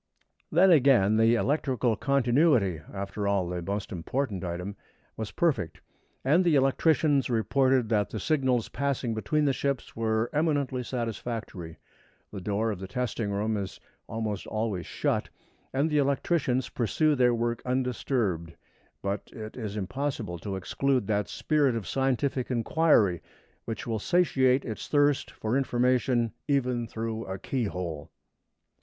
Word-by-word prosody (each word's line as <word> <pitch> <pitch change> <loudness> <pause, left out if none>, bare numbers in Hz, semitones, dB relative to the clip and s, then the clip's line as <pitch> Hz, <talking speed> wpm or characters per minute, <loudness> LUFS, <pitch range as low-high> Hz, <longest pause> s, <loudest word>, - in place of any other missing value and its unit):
Then 180 +4 +6
again, 125 - +5
the 115 +1 +5
electrical 130 -3 +1
continuity 125 - +2
after 100 +1 -4
all, 100 -3 +1
the 90 0 -3
most 100 +3 -4
important 100 +3 -2
item 90 +3 -4 0.4
was 110 -2 -4
perfect, 145 - 0 0.5
and 160 +7 +4
the 170 -4 +3
electricians 140 +1 +3
reported 125 +1 +2
that 105 -3 +1
the 110 - -4
signals 130 -2 +1
passing 135 -4 -1
between 150 +7 0
the 140 - +3
ships 140 -2 -2
were 110 0 0
eminently 145 -4 +1
satisfactory. 115 -8 -5 0.5
The 100 - -6
door 105 +4 0
of 100 - -5
the 95 - -6
testing 115 -1 -2
room 105 +2 0
is 100 -2 -4 0.3
almost 110 -3 -3
always 110 -6 -2
shut, - - -1 0.4
and 140 +4 +1
the 150 -2 +2
electricians 135 -2 +1
pursue 150 +6 +1
their 125 -3 +3
work 120 0 -1
undisturbed; 125 - -1 0.5
but 100 0 -3
it 110 -1 -8
is 110 -4 -5
impossible 110 -3 -3
to 95 +3 -4
exclude 130 +6 0
that 105 -1 0
spirit 145 -5 +1
of 110 -4 -3
scientific 135 +1 0
inquiry 120 - +3 0.4
which 115 -2 -5
will 115 -2 -2
satiate 135 - +2
its 110 -3 -5
thirst 145 -1 +2
for 110 +3 -3
information 125 -2 +2 0.2
even 125 -4 +1
through 115 0 -4
a 95 0 -4
keyhole. 90 - -3
120 Hz, 135 wpm, -28 LUFS, 105-135 Hz, 0.5 s, Then